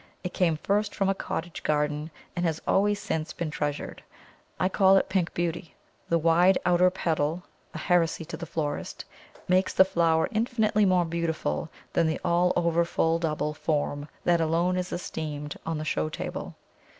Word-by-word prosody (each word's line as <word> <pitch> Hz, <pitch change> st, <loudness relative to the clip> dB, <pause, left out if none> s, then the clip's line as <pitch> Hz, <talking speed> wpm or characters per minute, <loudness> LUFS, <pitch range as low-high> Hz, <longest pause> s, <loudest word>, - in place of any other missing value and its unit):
It 180 Hz, -, -4 dB
came 165 Hz, -4 st, +2 dB
first 205 Hz, +5 st, 0 dB
from 195 Hz, -2 st, +1 dB
a -, -, +3 dB
cottage 175 Hz, -3 st, -5 dB
garden, 150 Hz, 0 st, 0 dB, 0.3 s
and 175 Hz, -, -1 dB
has 160 Hz, -2 st, 0 dB
always 205 Hz, +1 st, +3 dB
since 160 Hz, -5 st, -3 dB
been 165 Hz, -3 st, -4 dB
treasured. 145 Hz, -1 st, -3 dB, 0.6 s
I 185 Hz, -, +3 dB
call 190 Hz, 0 st, +5 dB
it -, -, +1 dB
Pink 185 Hz, -3 st, 0 dB
Beauty. 170 Hz, 0 st, -3 dB, 0.3 s
The 170 Hz, -, +3 dB
wide 170 Hz, +3 st, +4 dB
outer 180 Hz, +1 st, +5 dB
petal 165 Hz, -2 st, -1 dB, 0.3 s
(a -, -, -3 dB
heresy 165 Hz, 0 st, +1 dB
to 170 Hz, -, -6 dB
the 170 Hz, -, -7 dB
florist) 150 Hz, -2 st, -4 dB, 0.4 s
makes 185 Hz, +1 st, +2 dB
the 190 Hz, -, +7 dB
flower 165 Hz, -3 st, +2 dB
infinitely 220 Hz, -2 st, +2 dB
more 180 Hz, -2 st, +3 dB
beautiful 165 Hz, -, -2 dB, 0.2 s
than 170 Hz, -, +3 dB
the 160 Hz, -, -1 dB
all 175 Hz, +1 st, +3 dB
over 170 Hz, -1 st, +2 dB
full 165 Hz, -1 st, +1 dB
double 150 Hz, -2 st, -1 dB
form 145 Hz, -1 st, -2 dB
that 170 Hz, -1 st, +3 dB
alone 170 Hz, +3 st, +1 dB
is 180 Hz, 0 st, -2 dB
esteemed 150 Hz, -4 st, -5 dB
on 165 Hz, -1 st, -1 dB
the 155 Hz, -, -4 dB
show 75 Hz, -, -1 dB
table. -, -, -5 dB
170 Hz, 170 wpm, -27 LUFS, 155-180 Hz, 0.6 s, the